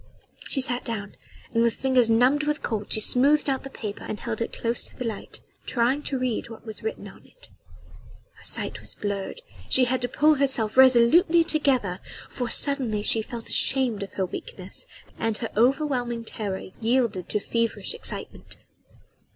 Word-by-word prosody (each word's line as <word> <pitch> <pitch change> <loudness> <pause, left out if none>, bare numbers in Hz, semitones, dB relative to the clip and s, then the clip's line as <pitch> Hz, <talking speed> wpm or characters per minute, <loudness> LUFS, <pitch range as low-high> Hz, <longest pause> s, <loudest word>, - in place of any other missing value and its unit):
She 270 - -1
sat 250 -1 +1
down 210 -4 -5 0.4
and 230 - +2
with 235 -1 +2
fingers 255 -3 +2
numbed 250 +6 +4
with 300 0 -1
cold 215 -3 -3
she - - +6
smoothed 280 +7 +5
out 270 -2 0
the 270 - -7
paper 210 -6 -7
and 210 - -5
held 230 -1 -4
it 230 - -2
close 235 +1 -1
to - - -16
the 250 - -4
light, 220 -3 -5 0.3
trying 250 +4 +1
to 275 - -3
read 250 -3 -2
what 225 0 -11
was 220 -2 -8
written 445 - -5
on - - -14
it. - - -13 0.8
Her - - -19
sight - - 0
was - - -5
blurred. 205 - -4 0.3
She 260 - +6
had 255 +1 -1
to 245 - -1
pull 300 +5 +4
herself 265 -7 +1
resolutely 265 +7 +6
together, 270 - 0 0.3
for 245 -2 -3
suddenly 250 -8 +1
she 225 - +4
felt 230 +1 -8
ashamed 255 -6 +2
of 200 - -6
her 190 - -1
weakness - - -7 0.3
and 225 -1 -1
her 230 - -5
overwhelming 245 -1 +1
terror 200 -5 -5
yielded 230 -6 0
to 210 - +1
feverish 230 +2 -1
excitement. 470 - -5
240 Hz, 175 wpm, -25 LUFS, 220-270 Hz, 0.8 s, she